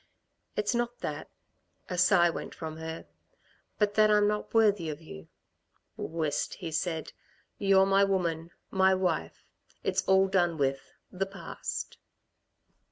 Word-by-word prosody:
"It's 210 +1 0
not 240 0 -2
that," - - -4 0.6
a 180 - -4
sigh 180 -1 +5
went - - -7
from 160 -1 -6
her 160 0 -6 0.7
"but 210 -1 +2
that 215 0 +5
I'm 210 -1 +4
not 210 0 -2
worthy 205 -7 +3
of 150 -1 -5
you." 80 - -11 0.7
"Whist," 160 -3 -2
he 170 -4 -6
said. 160 0 -2 0.5
"You're 195 -1 +5
my 195 +1 +4
woman 170 -4 0 0.2
my 190 0 +4
wife. 175 - -2 0.4
It's - - +1
all 190 0 +5
done 175 -4 +1
with, 135 -1 -1 0.2
the 195 +1 -2
past." 195 -3 -6
185 Hz, 135 wpm, -29 LUFS, 160-200 Hz, 0.7 s, sigh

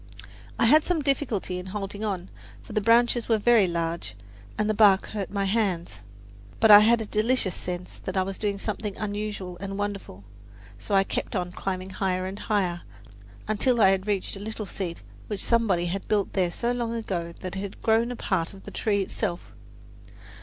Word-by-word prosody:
I - - +3
had 300 +6 +6
some 335 -4 0
difficulty 245 -10 -1
in 180 - -8
holding 200 +1 -5
on, 190 -4 -3 0.3
for - - -10
the 215 - +1
branches 235 +2 +3
were 225 - +4
very 220 -2 +4
large 165 - -3 0.4
and 210 - +1
the 215 - +2
bark 200 -3 +5
hurt 205 -4 -4
my 200 -1 -1
hands. 195 - -1 0.6
But 220 -1 +6
I 205 - +12
had 225 +2 +4
a - - -3
delicious 215 -2 +1
sense 180 0 -6
that 190 0 -5
I 190 - +3
was 195 0 -5
doing 205 -2 -1
something 210 0 -4
unusual 205 -3 -4
and 195 +1 -5
wonderful 200 - -5 0.6
so 205 - -1
I 195 - +5
kept - - -4
on 180 -2 -2
climbing 185 0 -4
higher 185 -1 -1
and 190 +2 -6
higher, 185 -5 0 0.7
until 230 +3 +1
I 195 -3 +6
reached 195 +1 -1
a - - -8
little 215 +1 -5
seat 180 -3 -5 0.2
which 205 -2 -2
somebody 215 -7 +2
had 190 +3 -4
built 205 -2 0
there 185 -3 +1
so 235 +7 -1
long 235 -1 -2
ago 180 -7 -3
that 185 0 -5
it - - -3
had 195 0 -7
grown 225 +1 +3
part 185 -3 -1
of 195 - -14
the - - -9
tree 200 -2 0
itself. 185 -2 -4
200 Hz, 190 wpm, -26 LUFS, 185-220 Hz, 0.7 s, I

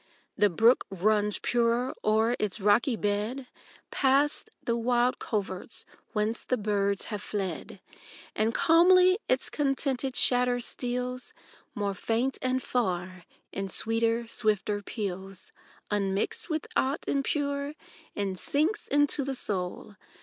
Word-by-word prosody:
The 205 - +4
brook 225 +8 +3
runs 210 +2 +1
purer 240 +1 +1
o'er 220 +3 +2
its 210 0 0
rocky 210 +5 +3
bed. 210 +6 -2 0.5
Past 280 +2 +2
the 235 - 0
wild 240 +1 +1
coverts 200 -2 -4 0.3
whence 215 +1 -1
the 255 - 0
birds 200 -2 0
have 205 - -3
fled; 200 -3 -4 0.6
And 220 +1 +1
calmly 365 - +5
its - - +1
contented 270 -2 -1
chatter 245 -1 +4
steals 250 +1 -4 0.4
More 205 -1 -1
faint 230 +7 -1
and 255 0 0
far, 185 -6 -2 0.3
in 195 0 -4
sweeter, 230 +2 0
swifter 210 -2 0
peals, 195 -3 -6 0.4
Unmixed 200 - -1
with 315 -2 -2
ought 270 +3 0
impure, 280 +1 -1 0.4
and 195 -2 -2
sinks 315 +9 0
into 290 0 +2
the 270 0 -3
soul. 195 -2 -4
230 Hz, 120 wpm, -28 LUFS, 205-260 Hz, 0.6 s, calmly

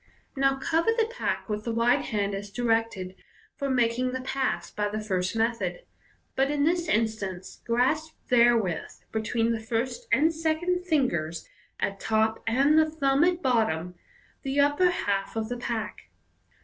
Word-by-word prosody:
Now 270 0 +2
cover 325 +8 +1
the 455 - +3
pack 465 +2 -3
with 210 -1 -3
the 235 - -2
right 235 +1 +3
hand 205 -2 -1
as 200 +1 -5
directed 225 -4 -1 0.4
for 280 -1 -3
making 250 0 +1
the 260 - -3
pass 255 -10 -2
by 210 -1 -1
the 215 +1 -3
first 190 -2 -1
method, 230 - -1 0.5
but 270 +1 +2
in 290 -1 +1
this 340 +2 +1
in 225 +1 +3
stance 195 -4 -7
grasp 305 +7 +1
therewith 235 -8 +2
(be 220 - -1
tween 230 +1 0
the 230 - -1
first 240 - -3
and 320 +2 +4
second 340 +3 -1
fingers 170 - 0 0.3
at 195 0 -2
top 220 0 +1
and 275 +7 +4
the 315 0 +3
thumb 280 -2 +2
at 355 0 +1
bottom) 200 -9 +1 0.5
the 275 +1 -1
upper 290 +6 +4
half 200 - -1
of 220 0 -2
the 245 - -3
pack. 235 -2 -4
240 Hz, 160 wpm, -27 LUFS, 215-290 Hz, 0.5 s, and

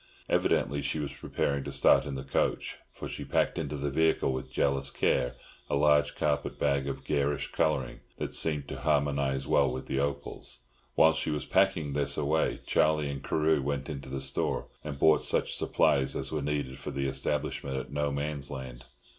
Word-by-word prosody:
Evidently 70 +2 +1
she - - -2
was 75 -2 -3
preparing 70 -1 -2
to 70 - -5
start 70 0 +5
in 70 - -4
the 65 - -5
coach, 70 - -1
for - - -7
she - - -6
packed - - 0
into 75 - -3
the 70 0 -2
vehicle 80 -2 +2
with 65 0 -5
jealous 70 0 +1
care 60 -3 +1 0.3
a - - +1
large 75 0 +3
carpet 75 -1 -1
bag 70 -1 +1
of 70 - -4
garish 70 -1 0
colouring 75 -4 0 0.2
that - - -4
seemed 75 -3 +1
to - - -6
harmonise 70 -2 +1
well 70 +1 +3
with 65 +1 -5
the 65 - -1
opals. 70 0 -4 0.3
While 80 0 +6
she 80 0 -2
was 75 -2 -2
packing 75 -3 +2
this 70 0 +1
away, 75 +2 +1
Charlie 75 -2 +2
and 70 -1 -6
Carew 80 0 +2
went 70 0 -2
into 70 -3 -6
the 70 0 -4
store, 65 0 -1
and 75 -2 -5
bought 80 +2 +4
such - - +1
supplies 65 -2 +2
as 65 - -2
were 75 -1 -1
needed 70 -3 -2
for - - -6
the 70 0 -2
establishment 65 0 -2
at 65 - -6
No 75 0 0
Man's 70 0 -2
Land. 65 -3 -7
70 Hz, 190 wpm, -29 LUFS, 70-75 Hz, 0.3 s, While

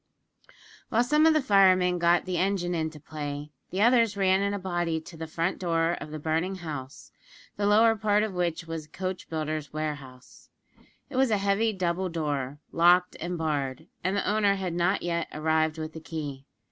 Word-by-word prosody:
While 230 +2 +3
some 300 +5 +4
of 320 - +5
the 305 - +2
firemen 185 -4 +4
got 170 0 +3
the 180 -2 -1
engine 185 -2 0
into 160 -2 -3
play, 145 -1 -6 0.2
the 195 +3 0
others 230 -3 +4
ran 190 0 +3
in 200 0 0
a 205 - -2
body 175 -4 -1
to 165 +2 -12
the 160 0 -6
front 165 +3 -2
door 165 -2 +1
of - - -7
the 155 - -6
burning 160 +5 -1
house, 150 -7 -7 0.4
the 205 - 0
lower 225 +2 +5
part 210 -1 +2
of 215 -3 -3
which 170 -2 -1
was 165 -2 -6
a - - -36
coach 185 +2 -5
builder's 155 -2 -3
warehouse. 145 -5 -6 0.6
It 275 - -6
was 265 -1 +4
a 215 - +2
heavy 200 +3 +1
double 185 -1 -1
door, 145 -4 -2
locked 180 +2 +4
and 175 +1 -3
barred, 145 -5 -2 0.2
and 185 +3 0
the - - -1
owner 205 -1 +3
had 185 -3 -3
not 175 +3 +1
yet 170 -1 -1
arrived 160 +1 +1
with 155 0 -5
the 160 - -7
key. 145 -4 -6
175 Hz, 190 wpm, -27 LUFS, 155-195 Hz, 0.6 s, of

